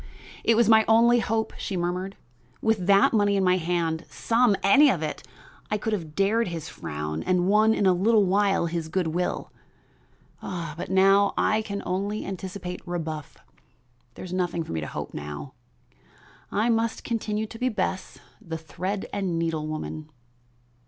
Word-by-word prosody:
"It 230 - +4
was 235 +1 +4
my 220 -1 +6
only 235 +2 +5
hope," 220 0 -1
she 190 - -3
murmured. 180 +2 -3 0.4
"With 220 -5 0
that 200 +2 +5
money 205 -2 +3
in 195 - +2
my 185 0 +4
hand 165 -1 -1
some, 230 -2 +2
any 275 +9 +6
of 170 -10 0
it, 155 - -4 0.5
I 210 - 0
could 220 +2 -2
have 160 -7 -4
dared 210 +3 +2
his 165 -3 -5
frown 75 -1 -5
and 180 0 +1
won 215 +2 +4
in 200 - +1
a 185 - +5
little 210 +3 +3
while 195 -1 +2
his 165 -1 -3
good 175 -1 0
will, 175 +3 -2 0.9
but 170 -2 -5
now 195 +1 +4
I 215 +1 +2
can 200 -2 -5
only 200 +4 -2
anticipate 190 -1 -6
rebuff. 160 -3 -5 0.8
There - - -8
is 180 - -7
nothing 175 -2 -1
for - - -9
me 80 -1 -2
to 75 - -5
hope - - -6
for - - -7
now. 75 -1 -7 1.0
I 215 +3 +1
must 225 -1 0
continue 220 -2 -2
to 225 +1 -11
be 255 - +1
Bess, 190 -3 -3 0.2
the 165 -1 -5
thread 185 +5 -4
and 190 -4 -1
needle 165 -2 -1
woman." 155 0 -5
190 Hz, 170 wpm, -26 LUFS, 165-210 Hz, 1.0 s, my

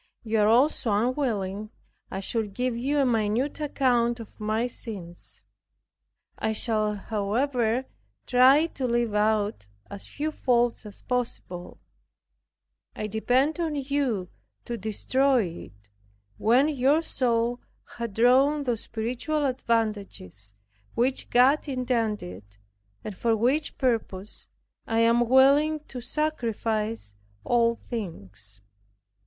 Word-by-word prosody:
You 225 -1 0
are 210 - +4
also 245 +1 +3
unwilling 215 -3 -1 0.4
I 195 - -4
should 210 -1 -3
give 250 -1 -1
you 270 +5 -1
a 280 - +3
minute 230 +4 0
account 245 -5 +1
of 230 - -11
my 215 +2 0
sins. 195 -8 -8 1.0
I 220 - 0
shall, 215 -1 +1
however, 225 +4 -1 0.4
try 265 +5 +6
to 275 -6 -3
leave 235 -2 0
out 210 - +1 0.2
as 200 -1 -8
few 305 +2 -3
faults 240 -5 +1
as 205 - -12
possible. 230 -8 -4 1.2
I 215 - -4
depend 250 - +1
on 320 -3 -1
you 265 -9 -1 0.4
to 240 - -3
destroy 250 +4 +1 0.2
it, 100 +1 -22 0.5
when 245 +6 +4
your 290 +2 +2
soul 240 -4 0 0.4
hath 235 -4 -4
drawn 270 +5 +4
those 240 -4 -1
spiritual 250 +7 -2
advantages 205 - -2 0.4
which 255 +3 0
God 265 +6 +4
intended, 225 - -2 0.6
and 210 - -6
for 225 +3 +1
which 260 +8 0
purpose 220 -6 -1 0.4
I 225 0 +1
am 235 +1 +3
willing 280 +4 +5
to 250 - -6
sacrifice 225 - -2 0.3
all 235 - +2
things. 100 - -7
235 Hz, 115 wpm, -26 LUFS, 215-260 Hz, 1.2 s, try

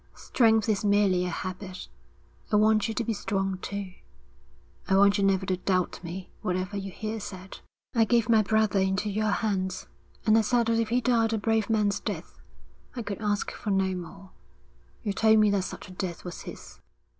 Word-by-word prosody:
Strength 225 -3 +2
is 210 -2 +1
merely 200 -3 +3
a - - -2
habit. 185 +1 -6 0.6
I - - +3
want 215 +1 +4
you 225 - -3
to 240 - 0
be 230 - -1
strong, 195 -2 -2
too. 200 -1 -5 1.0
I 190 - +3
want 200 0 +5
you - - +1
never 190 -1 +2
to 185 -1 0
doubt 185 -1 -1
me 180 +2 -7
whatever 185 +2 -2
you 195 -1 -4
hear 220 +3 -4
said.' 190 -2 -8 0.3
'I 230 -2 +4
gave 235 0 +2
my 225 -2 +5
brother 215 -1 +2
into 190 +2 0
your 215 +1 0
hands, 190 -3 -1 0.4
and 215 -1 +5
I 225 - +6
said 235 +2 +2
that 230 0 +1
if 225 -1 0
he 245 +2 +2
died 230 -2 +2
a - - +1
brave 220 +1 0
man's 210 -2 +1
death, - - -6 0.6
I 240 - -4
could 205 0 -5
ask 205 -1 -1
for 210 - -6
no 190 -1 +1
more. 185 +2 -9 0.7
You 205 -3 -1
told 220 +2 +4
me 215 -1 +5
that 195 -2 +1
such - - -8
a - - -12
death 180 -2 -5
was 175 - -7
his.' - - -10
205 Hz, 195 wpm, -27 LUFS, 190-220 Hz, 1.0 s, I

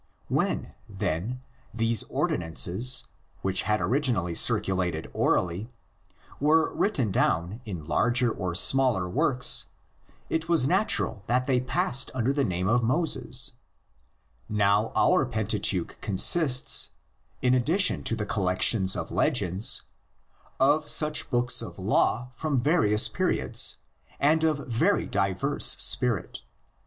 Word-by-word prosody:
When, - - -2 0.2
then, 100 +5 -4 0.3
these 115 -1 +1
ordi - - -2
nances, 90 +9 0 0.4
which 95 0 +1
had 105 0 +2
originally 120 - 0
circulated 90 -2 0
orally, 90 +6 -1 0.7
were 155 +3 +2
written 135 - -1
down 90 +5 -1
in 90 -8 -7
larger 120 +9 +1
or 90 -5 -4
smaller 120 -1 +2
works, 125 +8 +1 0.6
it 160 +1 -3
was 165 -6 +2
natural 185 - 0
that 125 +2 0
they 130 -2 +1
passed 130 0 -1
under 130 +2 0
the 140 -1 0
name 90 -4 -2
of 120 +4 +2
Moses 130 -1 0 1.0
Now 105 +1 +1
our - - +3
Pentateuch - - -1
consists, 130 - +3 0.5
in 125 0 +3
addition 160 +10 +2
to 115 - +1
the 105 - -4
col 100 -2 -2
lections 95 +1 +2
of - - -7
legends, 95 +5 +1 0.8
of 145 +3 +2
such 150 -1 +2
books 125 -2 +2
of 115 - -9
law 115 +5 0
from 150 -4 -1
various 120 -7 +3
periods - - 0 0.4
and 155 +3 +2
of 150 -3 -1
very 160 - +1
diverse 100 +8 +1
spirit. 125 -7 +1
120 Hz, 120 wpm, -26 LUFS, 95-135 Hz, 1.0 s, our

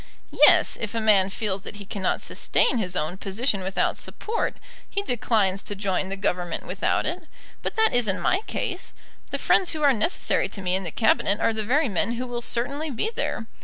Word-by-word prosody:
"Yes. - - +5
If 230 0 -4
a - - +1
man 205 -3 +4
feels 200 -1 -2
that 210 - -8
he 205 -1 -9
cannot 195 -1 -1
sustain 250 - +1
his 185 -4 -2
own 160 +3 -2
position 200 +2 -1
without 190 +1 0
support, 450 +1 -2 0.3
he 400 - -2
declines 215 - +1
to 205 - -5
join 190 -1 -1
the 195 - -3
Government 180 -3 -2
without - - 0
it. - - -2 0.4
But - - -3
that 445 0 +3
isn't 225 -6 +2
my 370 - +2
case. 365 0 -3 0.4
The - - -2
friends 365 -3 +2
who 310 -1 -3
are 280 -2 +6
necessary 260 - +1
to 195 - -7
me 180 0 0
in 190 0 -2
the - - -2
Cabinet 210 -1 +2
are 230 - +2
the 220 0 -1
very 275 +7 +2
men 215 +2 0
who 245 +2 -4
will 240 -1 -4
certainly 280 +7 -1
be 290 - -2
there. 225 - -2
215 Hz, 200 wpm, -24 LUFS, 195-250 Hz, 0.4 s, are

